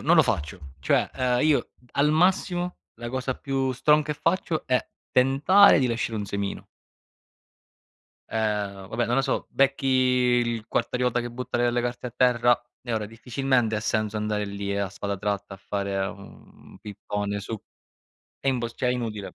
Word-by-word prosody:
non -, -, +4 dB
lo -, -, +7 dB
faccio. 75 Hz, +5 st, -2 dB, 0.2 s
Cioè, 70 Hz, -, +1 dB
ehm, 125 Hz, -1 st, +1 dB
io 155 Hz, -2 st, +2 dB, 0.2 s
al 145 Hz, +1 st, +3 dB
massimo 180 Hz, +1 st, +1 dB, 0.2 s
la 120 Hz, -, -7 dB
cosa 130 Hz, +1 st, -2 dB
più 135 Hz, -1 st, -1 dB
strong 150 Hz, +4 st, +3 dB
che 150 Hz, 0 st, -2 dB
faccio 165 Hz, 0 st, -1 dB
è 130 Hz, -1 st, +2 dB, 0.3 s
tentare 140 Hz, +10 st, +6 dB
di 130 Hz, -, +2 dB
lasciare 115 Hz, -1 st, -2 dB
un 105 Hz, -, -2 dB
semino. 100 Hz, 0 st, -4 dB, 1.6 s
Ehm, 105 Hz, -3 st, -2 dB
vabbè, 120 Hz, +2 st, -1 dB
non 120 Hz, -, 0 dB
lo 135 Hz, -, +4 dB
so, 135 Hz, -, -1 dB
becchi 135 Hz, 0 st, +1 dB
il 125 Hz, -3 st, +2 dB
quartariota 125 Hz, -1 st, 0 dB
che 120 Hz, -, -5 dB
butta 125 Hz, 0 st, -4 dB
le 120 Hz, 0 st, +3 dB
le 120 Hz, -, 0 dB
carte 120 Hz, +1 st, -3 dB
a -, -, -5 dB
terra 120 Hz, -1 st, +4 dB, 0.2 s
e 120 Hz, -2 st, -5 dB
ora 110 Hz, -1 st, -1 dB
difficilmente 120 Hz, 0 st, 0 dB
ha -, -, -2 dB
senso 110 Hz, -1 st, -1 dB
andare 105 Hz, -1 st, -1 dB
lì 100 Hz, 0 st, -4 dB
e 100 Hz, -, -1 dB
a 100 Hz, -1 st, -1 dB
spada 100 Hz, +1 st, -4 dB
tratta 100 Hz, 0 st, -3 dB
a -, -, -11 dB
fare 100 Hz, 0 st, -3 dB
un 100 Hz, 0 st, -13 dB
pippone 105 Hz, 0 st, -4 dB
su 110 Hz, +2 st, -5 dB, 0.8 s
è 135 Hz, -, -2 dB
impos 120 Hz, -3 st, -1 dB
cioè, 125 Hz, -, 0 dB
è -, -, +3 dB
inutile. 110 Hz, -5 st, -4 dB
120 Hz, 175 wpm, -25 LUFS, 105-130 Hz, 1.6 s, lo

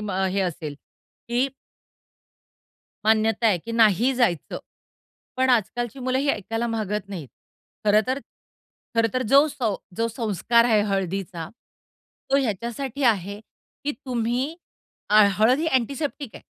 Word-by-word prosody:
मग 195 Hz, -2 st, -1 dB
हे 200 Hz, -, 0 dB
असेल, 165 Hz, -5 st, -3 dB, 0.5 s
की 245 Hz, +3 st, +2 dB, 1.6 s
मान्यता 220 Hz, +1 st, +3 dB
आहे, 200 Hz, -5 st, +3 dB
की 230 Hz, +8 st, -8 dB
नाही 230 Hz, +2 st, +4 dB
जायचं. 230 Hz, -, 0 dB, 0.8 s
पण 260 Hz, 0 st, +3 dB
आजकालची 240 Hz, +2 st, 0 dB
मुलं 255 Hz, +1 st, 0 dB
ही 280 Hz, +2 st, 0 dB
ऐकायला 225 Hz, +1 st, -2 dB
मागत 210 Hz, -3 st, -3 dB
नाहीत. 175 Hz, -9 st, -7 dB, 0.6 s
खरं 210 Hz, 0 st, +5 dB
तर 260 Hz, +1 st, 0 dB, 0.8 s
खरं 230 Hz, 0 st, +3 dB
तर 255 Hz, -, +1 dB
जो 280 Hz, +2 st, +7 dB
सौ 245 Hz, -8 st, -1 dB, 0.2 s
जो 230 Hz, -, +1 dB
संस्कार 230 Hz, 0 st, +2 dB
आहे 220 Hz, -3 st, +4 dB
हळदीचा. 190 Hz, -4 st, -3 dB, 0.8 s
तो 275 Hz, -, +5 dB
ह्याच्यासाठी 240 Hz, +2 st, -2 dB
आहे, 200 Hz, -3 st, +1 dB, 0.4 s
की 290 Hz, -, 0 dB
तुम्ही 250 Hz, +3 st, -1 dB, 0.6 s
अ, 215 Hz, +1 st, +7 dB
हळद 230 Hz, +5 st, +4 dB
ही 320 Hz, -, -1 dB
अँटिसेप्टिक 280 Hz, 0 st, -1 dB
आहे. -, -, -11 dB
225 Hz, 130 wpm, -24 LUFS, 205-255 Hz, 1.6 s, जो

